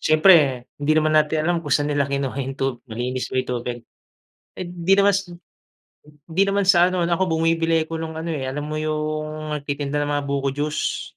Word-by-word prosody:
siyempre 155 Hz, -6 st, +5 dB, 0.2 s
hindi 145 Hz, +1 st, +2 dB
naman 155 Hz, 0 st, +2 dB
natin 155 Hz, 0 st, +2 dB
alam 170 Hz, 0 st, +1 dB
kung 155 Hz, -, -8 dB
saan 145 Hz, 0 st, +1 dB
nila 140 Hz, -1 st, 0 dB
kinuha 140 Hz, -1 st, -2 dB
yung 135 Hz, 0 st, -5 dB
tub 135 Hz, -3 st, -2 dB
malinis 125 Hz, +3 st, -3 dB
ba -, -, -5 dB
yung 130 Hz, -, -1 dB
tubig. 120 Hz, 0 st, -4 dB, 0.8 s
Eh, 185 Hz, -, -4 dB
hindi 175 Hz, +1 st, -1 dB
naman 200 Hz, 0 st, +5 dB
sa 195 Hz, -, +1 dB, 1.1 s
hindi 170 Hz, +4 st, +2 dB
naman 200 Hz, 0 st, +1 dB
sa 180 Hz, -, +6 dB
ano 185 Hz, -, 0 dB
'no -, -, -1 dB
ako 190 Hz, -, +1 dB
bumibili 165 Hz, 0 st, +1 dB
ako 165 Hz, -, -4 dB
nung 160 Hz, 0 st, -5 dB
ano, 160 Hz, +1 st, -5 dB
eh, 150 Hz, -5 st, -3 dB
alam 130 Hz, +2 st, -3 dB
mo 155 Hz, -, -3 dB
yung 155 Hz, 0 st, -3 dB
nagtitinda 145 Hz, 0 st, -4 dB
ng 145 Hz, -, -3 dB
mga 145 Hz, -1 st, -1 dB
buko 140 Hz, 0 st, 0 dB
juice? 150 Hz, +2 st, -2 dB
155 Hz, 205 wpm, -22 LUFS, 140-165 Hz, 1.1 s, sa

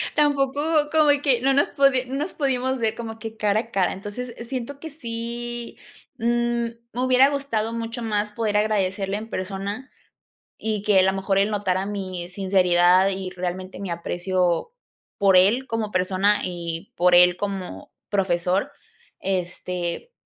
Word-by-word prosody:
tampoco 285 Hz, -2 st, +2 dB, 0.3 s
como 310 Hz, -2 st, +4 dB
que 260 Hz, -5 st, +2 dB
no 270 Hz, +2 st, +3 dB
nos 285 Hz, -, +2 dB, 0.3 s
no 260 Hz, -, -6 dB
nos 300 Hz, +6 st, -2 dB
pudimos 260 Hz, -2 st, 0 dB
ver, 225 Hz, -2 st, 0 dB
como 225 Hz, -1 st, -7 dB
que 225 Hz, 0 st, -7 dB
cara 210 Hz, 0 st, +2 dB
a -, -, -10 dB
cara. 190 Hz, -2 st, +1 dB
Entonces, 220 Hz, +5 st, -6 dB
siento 265 Hz, +1 st, -5 dB
que 320 Hz, -, -7 dB
sí, 240 Hz, -3 st, -5 dB, 0.4 s
mm, 230 Hz, -, -6 dB, 0.7 s
me 250 Hz, -, -2 dB
hubiera 255 Hz, +1 st, +5 dB
gustado 250 Hz, -6 st, -2 dB
mucho 230 Hz, +1 st, -4 dB
más, 210 Hz, -2 st, -1 dB
poder 210 Hz, -1 st, -1 dB
agradecerle 200 Hz, -2 st, 0 dB
en 220 Hz, +2 st, -7 dB
persona. 200 Hz, +7 st, -4 dB, 0.7 s
Y 215 Hz, -2 st, -2 dB
que 205 Hz, -3 st, +4 dB
a -, -, +5 dB
la 190 Hz, +1 st, +3 dB
mejor, 195 Hz, 0 st, -1 dB
él 200 Hz, +2 st, +2 dB
notara 195 Hz, -2 st, 0 dB
mi 185 Hz, -3 st, -5 dB
sinceridad 185 Hz, -1 st, +4 dB
y, 190 Hz, -1 st, -4 dB
realmente, 185 Hz, +1 st, -5 dB
mi 195 Hz, -2 st, -5 dB
aprecio 175 Hz, -, -1 dB, 0.5 s
por 195 Hz, -2 st, +5 dB
él, 215 Hz, +8 st, +4 dB
como 225 Hz, -3 st, -2 dB
persona, 190 Hz, +2 st, +2 dB
y 170 Hz, -2 st, -5 dB
por 180 Hz, +1 st, +4 dB
él 180 Hz, 0 st, +6 dB
como 195 Hz, -2 st, -5 dB, 0.2 s
profesor. 190 Hz, +5 st, 0 dB, 0.5 s
Este, 180 Hz, -, -3 dB
205 Hz, 150 wpm, -23 LUFS, 185-240 Hz, 0.7 s, él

